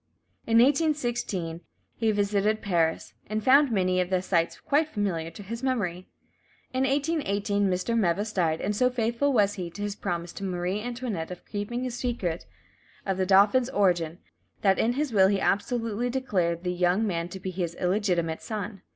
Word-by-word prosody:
In 225 0 +4
1816 240 - +1 0.3
he 225 -1 +1
visited 205 +1 +1
Paris, 165 -5 0
and 215 +1 -2
found 275 +2 +5
many 185 -3 +2
of 180 - -2
the 185 -1 +1
sights 170 -3 0
quite 300 +2 +1
familiar 190 - -2
to 205 - -11
his 230 +4 -6
memory. 200 -9 -2 0.7
In 260 +1 +1
1818 215 -9 0
Mr. 185 +6 -1
Meves 205 +1 +1
died, 160 -4 +1
and 210 +1 -1
so 250 +4 +3
faithful 240 +3 0
was 205 -5 +3
he 180 -4 -5
to 205 +4 -7
his 205 -1 -3
promise 170 -3 -4
to - - -7
Marie 185 +2 -2
Antoinette 235 -8 -4
of 180 -1 -9
keeping 220 +4 -4
the 255 - -2
secret 235 -9 -3 0.6
of 195 -2 -1
the 185 -1 0
dauphin's 205 +6 +5
origin, 175 -6 +1 0.5
that 195 -2 +4
in 235 - +2
his 285 -1 -2
will 190 -2 +6
he 200 0 +1
absolutely 230 +3 0
declared 185 -10 -1
the 180 -1 -1
young 180 +4 +2
man 170 -4 -2
to 190 - -7
be 185 0 -4
"his 175 -2 -3
illegitimate 180 -4 0
son." 205 -2 -5
205 Hz, 175 wpm, -27 LUFS, 180-235 Hz, 0.7 s, will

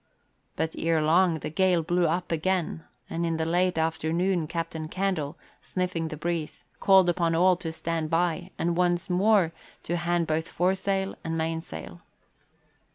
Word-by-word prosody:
But 160 0 -1
ere 165 -1 +2
long 165 +2 +3
the - - -4
gale 180 0 +2
blew 175 +1 +2
up 175 +3 -1
amain, 165 0 -1 0.2
and 170 - -3
in 165 -1 0
the 160 - -1
late 180 +1 +1
afternoon 160 +2 0
Captain 165 -1 -4
Candle, 175 -5 -2 0.2
sniffing 180 -3 -2
the 155 - -6
breeze, 165 -1 -3
called 190 -2 +6
upon 170 -1 +1
all 180 +2 +5
to 165 -2 -5
stand 160 -1 -3
by 170 +1 0
and 170 +1 0
once 175 +1 +1
more 190 -2 +4 0.3
to 175 - -1
hand 175 0 0
both 160 0 -1
foresail 190 +2 0
and 165 0 -2
mainsail. 160 0 -4
170 Hz, 155 wpm, -27 LUFS, 160-180 Hz, 0.3 s, called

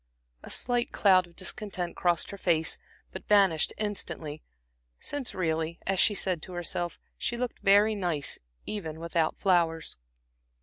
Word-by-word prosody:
A - - -11
slight 245 -1 0
cloud 185 -3 +4
of 170 - -21
discontent 185 -2 -4
crossed 175 -3 +1
her 200 - -7
face, 160 -3 +1 0.3
but - - -9
vanished 195 -7 +4
instantly; 165 -7 -3 0.6
since 285 -4 -4
really, 165 -2 -1
as 195 -1 +1
she 205 - +4
said 185 -4 0
to 185 - -8
herself, 175 0 -2 0.2
she 240 - -1
looked 250 0 -3
very 205 +2 +5
nice 175 -8 -1 0.3
even 160 -7 -5
without 165 -1 0
flowers. 170 -4 +1
180 Hz, 140 wpm, -29 LUFS, 165-205 Hz, 0.6 s, very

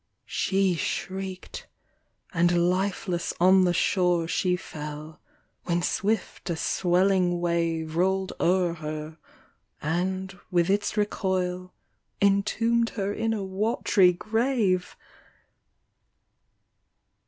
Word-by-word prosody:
She 195 -1 +1
shriek'd, 190 +2 -4 0.7
and 175 0 +3
lifeless 185 -2 -2
on 185 +1 +6
the 175 - +3
shore 175 -2 +2
She 180 +1 +1
fell; 150 -2 -8 0.5
when 175 -1 0
swift 210 0 -1
a 170 - 0
swelling 180 +1 +2
wave 165 -2 -1
Roll'd 190 +2 +1
o'er 180 -1 +2
her, 155 0 -6 0.6
and, 185 +4 -2
with 175 +1 +2
its 205 +1 0
recoil, 185 -3 -1 0.4
Entomb' 215 +4 +2
d - - -8
her 200 -1 -2
in 225 +1 -1
a 215 -3 -2
wat'ry 195 -1 +2
grave 215 -2 0
185 Hz, 95 wpm, -26 LUFS, 175-195 Hz, 0.7 s, on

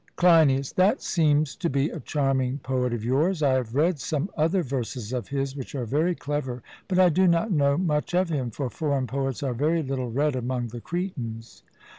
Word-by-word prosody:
CLEINIAS: 155 -7 +4
That 195 +7 +2
seems 150 -3 +2
to 170 - -1
be 140 +3 0
a 165 - -6
charming 135 -3 0
poet 125 -1 0
of 115 -2 -3
yours; 155 +7 +1
I 135 -2 +4
have 125 -2 -1
read 160 +2 +2
some 155 +7 -2
other 165 +4 +1
verses 125 -3 -4
of 125 -2 -3
his, 135 -1 -2
which 135 0 -7
are 125 -3 -2
very 155 +9 +1
clever; 140 -6 -4 0.2
but 185 - 0
I 185 -1 +6
do 185 +3 +3
not 170 +5 +2
know 140 -4 +3
much 165 -1 0
of 180 -1 +2
him, 135 -6 -1
for 135 +3 -4
foreign 140 -2 -1
poets 135 0 -3
are 130 -3 -1
very 155 +6 +1
little 130 -3 -3
read 145 +4 0
among 125 -1 -2
the 120 +1 -8
Cretans. 125 -12 -5
140 Hz, 200 wpm, -25 LUFS, 130-165 Hz, 0.2 s, I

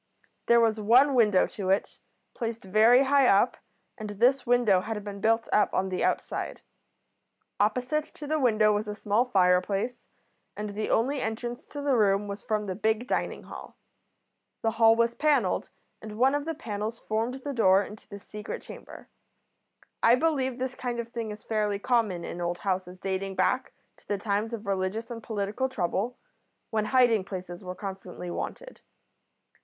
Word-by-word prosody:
There 235 0 +6
was 225 -1 +2
one 250 +7 +5
window 210 -6 +4
to 190 -3 -5
it, 195 +1 0 0.3
placed 230 -2 -4
very 220 +7 +5
high 275 -1 +4
up, 205 +4 +4 0.4
and 215 -1 -5
this 245 +6 +2
window 235 -6 +4
had 215 0 -4
been 200 -1 -7
built 225 +1 +2
up 210 - +3
on 190 0 0
the 185 - -2
outside. - - -2 1.0
Opposite 250 +8 +1
to 295 - -8
the 310 +1 0
window 215 -5 +4
was 210 +1 -1
a 210 - -4
small 210 +3 +1
fireplace, 195 +2 +1 0.5
and 210 0 -4
the 215 +1 -3
only 265 +4 +1
entrance 240 +2 -4
to 290 - -7
the 280 -2 +2
room 205 -2 +2
was 200 0 -6
from 215 -3 -1
the 190 - -3
big 220 +4 0
dining - - -2
hall. - - -11 0.9
The 225 - +2
hall 225 0 +5
was 235 0 +2
panelled, 275 -10 +1 0.3
and 215 -1 -8
one 260 +3 +4
of 290 0 -1
the 325 0 -3
panels 220 -5 -4
formed 225 +4 -2
the 285 - -3
door 195 -5 +4
into 210 +1 -12
the 200 - -8
secret 210 +1 -8
chamber. - - -11 0.9
I 230 - +6
believe 265 -4 0
this 260 0 -3
kind 245 -2 -4
of 235 0 -4
thing 230 -2 -4
is 210 0 -8
fairly 210 -2 0
common 205 -6 0
in 175 - -6
old 175 0 -1
houses 185 -2 -3
dating 190 +1 -3
back 255 +6 +1 0.3
to - - -27
the 205 - -1
times 205 +2 -1
of 225 -2 -6
religious 195 +4 -2
and 230 -1 -6
political 215 +4 -2
trouble, 215 +1 -2 0.5
when 215 -1 0
hiding 240 -4 +4
places 185 -1 -7
were 180 0 -6
constantly 190 -2 -7
wanted. - - -6
220 Hz, 170 wpm, -27 LUFS, 200-245 Hz, 1.0 s, There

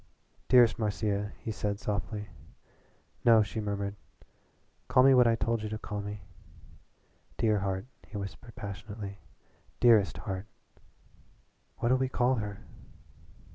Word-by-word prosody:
"Dearest 120 -4 +6
Marcia," 105 -1 -1
he 110 - -3
said 105 -1 -2
softly. 105 0 -3 1.0
"No," 115 -2 +7
she 105 +2 -5
murmured, 100 -1 -3 0.9
"call 130 - +5
me 135 0 +7
what 125 -2 +6
I 115 - +4
told 115 0 0
you 110 - -4
to 110 - -3
call 105 -1 -5
me." 105 0 -7 1.1
"Dear 110 -2 +2
heart," 95 0 -2 0.2
he 105 - -7
whispered 100 +4 -7
passionately 100 -1 -7 0.6
"dearest 110 -8 +5
heart." 95 +4 -5 1.3
"What'll 125 +2 +2
we 130 -1 0
call 125 0 +2
her?" 105 -3 -4
105 Hz, 125 wpm, -30 LUFS, 100-115 Hz, 1.3 s, No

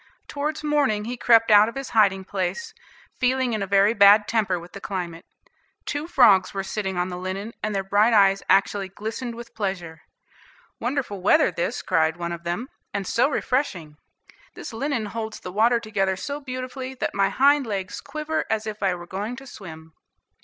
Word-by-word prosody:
Towards 300 +2 -3
morning 280 -9 +1
he 245 +2 -4
crept 230 -2 +4
out 210 +1 +7
of 230 - -11
his 270 0 -6
hiding 200 -4 +3
place, 200 - -3 0.5
feeling 255 -1 +1
in 215 - -2
a 195 - -2
very 200 +2 +4
bad 205 0 +6
temper 210 -5 +1
with 170 +1 -12
the 200 - -10
climate. 175 -4 -5 0.6
Two 290 +2 -3
frogs 205 - +4
were 195 - -2
sitting 190 -2 -3
on 180 +1 0
the 180 0 -6
linen, 195 +4 -5
and 210 -1 -2
their 195 - 0
bright 205 +4 +3
eyes 195 -3 +4
actually 195 0 +2
glistened 225 +5 -5
with 235 0 -10
pleasure. 185 -6 -4 0.8
"Wonderful 240 -6 -3
weather 185 - +4
this," 170 0 -3
cried 160 -2 +1
one 170 0 -4
of 170 0 -6
them, 175 +9 -3 0.2
"and 200 -1 -3
so 235 +8 +2
refreshing. 200 - -2 0.6
This - - -8
linen 245 -1 -2
holds 220 +1 -5
the 180 - -8
water 230 +4 +3
together 200 -4 -1
so 285 +9 -5
beautifully, 255 -1 -6
that - - -3
my 195 0 +2
hind 280 0 +3
legs 195 -2 -4
quiver 305 +2 -3
as 220 -1 -1
if 215 -1 -6
I 190 -2 +1
were 175 0 -9
going 205 +7 -4
to 270 +1 -11
swim." 160 -9 -11
210 Hz, 185 wpm, -24 LUFS, 190-250 Hz, 0.8 s, out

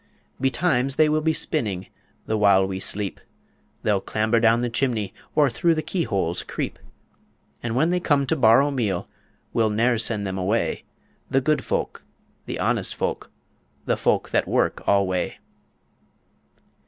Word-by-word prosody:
Betimes 135 -1 +1
they 155 - +4
will 155 0 +1
be 160 +1 +2
spinning 115 - -1 0.4
The 110 - -1
while 100 -2 +4
we 95 0 -4
sleep, 100 0 -2 0.6
They'll 105 -2 +1
clamber 110 +3 +1
down 115 +1 +4
the 120 - -1
chimney, 115 -5 -1 0.2
Or 150 -2 +5
through 160 +6 +1
keyholes 100 - -1
creep; - - -5 0.8
And 120 -1 -3
when 155 +7 +2
they 180 - +1
come 145 -5 +2
to 150 - +1
borrow 135 +2 +5
meal 105 -10 -1 0.5
We'll 115 -2 +2
ne'er 115 +4 +2
them 120 - 0
send 110 -3 +1
away 95 +4 -1 0.4
The 135 - +3
good 145 0 +1
folk, - - -3 0.4
the - - -4
honest - - 0
folk, - - -3 0.6
the - - +1
folk - - 0
that - - +1
work - - 0
alway. 95 -3 +1
115 Hz, 145 wpm, -23 LUFS, 100-140 Hz, 0.8 s, Or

